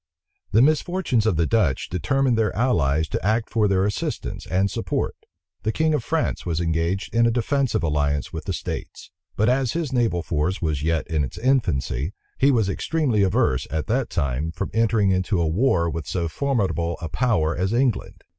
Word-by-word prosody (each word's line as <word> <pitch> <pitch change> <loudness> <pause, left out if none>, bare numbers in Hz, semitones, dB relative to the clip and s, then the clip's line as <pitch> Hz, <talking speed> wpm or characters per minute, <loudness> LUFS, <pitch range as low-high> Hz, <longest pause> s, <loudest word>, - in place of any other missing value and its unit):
The 115 +4 +5
misfortunes 155 - +1
of 95 - +2
the 85 +1 +2
Dutch 85 -10 +1
determined 130 - +1
their 110 -1 0
allies 80 - +1
to - - -3
act 110 +3 0
for 110 -3 +2
their 95 -1 +2
assistance 100 - -3
and 95 +3 +1
support. - - -2 0.5
The 110 +2 0
king 160 +5 +1
of 145 -6 0
France 165 +4 -1
was 85 -2 -2
engaged 85 +4 -1
in 115 0 +4
a - - +4
defensive 120 -2 0
alliance 75 -2 0
with - - -5
the - - -2
states; - - -6 0.2
but 110 - +2
as 130 -1 +2
his 160 -5 -2
naval 115 -9 +1
force 85 +5 -1
was 75 -4 -1
yet 80 +1 0
in 80 -3 0
its 65 - -5
infancy, 95 - 0 0.3
he 135 - +5
was 115 -7 +2
extremely 125 +1 0
averse, 90 -9 +1
at 80 0 -2
that 125 +2 0
time, 70 0 -1
from 100 - -4
entering 110 -3 +2
into 95 0 +1
a 85 - +2
war 85 +1 +2
with 80 -2 -4
so 85 -3 -1
formidable 90 - -1
a 85 - -4
power 90 -6 +1
as 95 +3 -1
England. 120 -1 0
100 Hz, 185 wpm, -23 LUFS, 80-120 Hz, 0.5 s, The